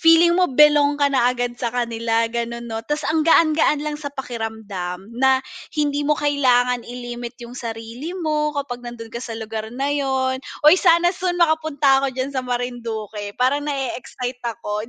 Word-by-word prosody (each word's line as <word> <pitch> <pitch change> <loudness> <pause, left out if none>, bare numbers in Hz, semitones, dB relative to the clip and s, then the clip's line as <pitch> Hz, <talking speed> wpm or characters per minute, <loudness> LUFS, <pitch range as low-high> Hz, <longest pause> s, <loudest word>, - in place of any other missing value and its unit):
feeling 330 +1 +6
mo 365 +1 +3
belong 290 +1 +5
ka 285 -1 +2
na 245 -2 +4
agad 245 -1 -2
sa 240 - 0
kanila, 230 -1 0
gano'n 235 0 -3
'no. 225 -1 -4
Tas 295 +6 -3
ang 315 0 +1
gaan-gaan 310 -2 +3
lang 300 0 -4
sa 285 - -4
pakiramdam 220 -7 -6
na 265 +2 +2 0.3
hindi 290 -1 +1
mo 300 +1 +1
kailangan 250 -4 +2
i-limit 240 0 -7
'yong 240 -1 -10
sarili 235 +7 -6
mo 300 -3 -1
kapag 260 -4 -3
nando'n 240 -2 -9
ka 235 - -5
sa 230 -3 -6
lugar 220 -1 -5
na 270 +5 -2
'yon. 265 -2 0 0.2
Uy, 305 +3 +9
sana 345 0 +4
soon 360 -1 -2
makapunta 315 -5 +3
ako 265 -2 -2
diyan 265 +2 -2
sa 260 - -1
Marinduque. 230 -4 -4
Parang 260 +4 +2
na-e-excite 255 -3 -4
ako 225 -2 -4
255 Hz, 170 wpm, -21 LUFS, 235-295 Hz, 0.3 s, Uy